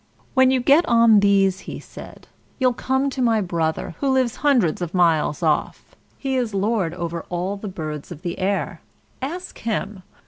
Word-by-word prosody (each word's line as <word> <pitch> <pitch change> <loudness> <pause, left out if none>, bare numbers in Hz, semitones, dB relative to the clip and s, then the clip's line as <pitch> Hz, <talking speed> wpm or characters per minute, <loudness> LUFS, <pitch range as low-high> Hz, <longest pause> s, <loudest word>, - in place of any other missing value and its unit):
] - - -34
"When 260 -1 +5
you 260 -1 +2
get 285 +7 +5
on 230 -2 +6
these," 195 -2 +3
he - - -6
said, - - -12 0.3
"you'll 255 -2 +2
come 265 +3 -1
to 260 - -4
my 230 -3 +3
brother, 170 -4 -2
who 280 - 0
lives 260 -3 +1
hundreds 245 - +2
of 175 +1 -4
miles 165 -3 +2
off; 155 -2 -1 0.2
he 270 -1 -2
is 235 -5 -2
lord 195 -4 0
over 170 -1 -4
all 180 +3 -2
the 205 +1 -7
birds 155 -5 -6
of 165 0 -9
the 175 0 -4
air. 195 +1 -2 0.4
Ask 345 +7 -6
him. 210 -3 -3
200 Hz, 180 wpm, -22 LUFS, 175-255 Hz, 0.4 s, on